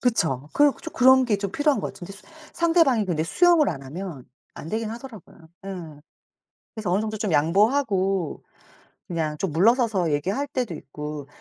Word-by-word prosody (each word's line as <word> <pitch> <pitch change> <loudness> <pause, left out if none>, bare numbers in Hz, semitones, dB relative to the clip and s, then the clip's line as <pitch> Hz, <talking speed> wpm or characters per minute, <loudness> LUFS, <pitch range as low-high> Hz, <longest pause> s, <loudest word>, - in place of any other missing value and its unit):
그쵸. 155 - 0
그 290 -1 +4
좀 - - -7
그런 260 0 +6
게 215 -4 +1
좀 200 -1 -4
필요한 290 -6 +1
것 - - -3
같은데. 180 +2 -10
수 200 - -14 0.3
상대방이 330 - +3
근데 165 -4 -1
수용을 335 - +4
안 140 - -4
하면 150 0 -7 0.3
안 160 - -9
되긴 220 +1 -2
하더라고요. 230 - -10 0.3
예. 165 -6 -8 0.7
그래서 215 -5 -3
어느 190 +3 +2
정도 215 0 -3
좀 205 -6 -2
양보하고 195 - +1 0.7
그냥 160 -3 -2
좀 185 0 -2
물러서서 205 - +2
얘기할 195 - -1
때도 255 -9 -3
있고 150 -1 -7
195 Hz, 330 characters per minute, -24 LUFS, 160-250 Hz, 0.7 s, 그런